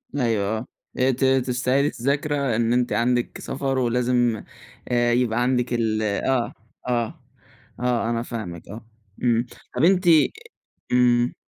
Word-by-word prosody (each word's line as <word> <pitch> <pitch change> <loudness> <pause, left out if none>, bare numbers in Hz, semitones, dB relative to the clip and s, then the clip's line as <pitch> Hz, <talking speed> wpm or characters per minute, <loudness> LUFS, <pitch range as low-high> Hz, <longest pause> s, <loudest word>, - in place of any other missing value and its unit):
أيوه 110 -5 0
آه. 115 - -7 0.3
آآ 130 +1 +4
ت 130 +2 -3 0.2
تستعيدي 125 +3 +1
الذاكرة 140 -1 -1
إن 115 +1 +1
أنتِ 125 -3 +1
عندِك 120 +2 0
سفر 135 0 -2
ولازم 120 -2 +1 0.5
آآ 120 -1 +2
يبقى 120 -1 +1
عندِك 125 -1 +1
ال 110 -2 0
آه، 115 +4 0 0.3
آه. 120 -2 -2 0.6
آه، 120 -2 0
أنا 115 0 -1
فاهمِك 105 -9 -7
آه. 110 +3 -9 0.4
إمم. 120 -1 +2 0.3
طَب 130 - +2
أنتِ 185 +1 +4 0.9
إمم. 120 -1 +3
120 Hz, 130 wpm, -23 LUFS, 115-125 Hz, 0.9 s, آآ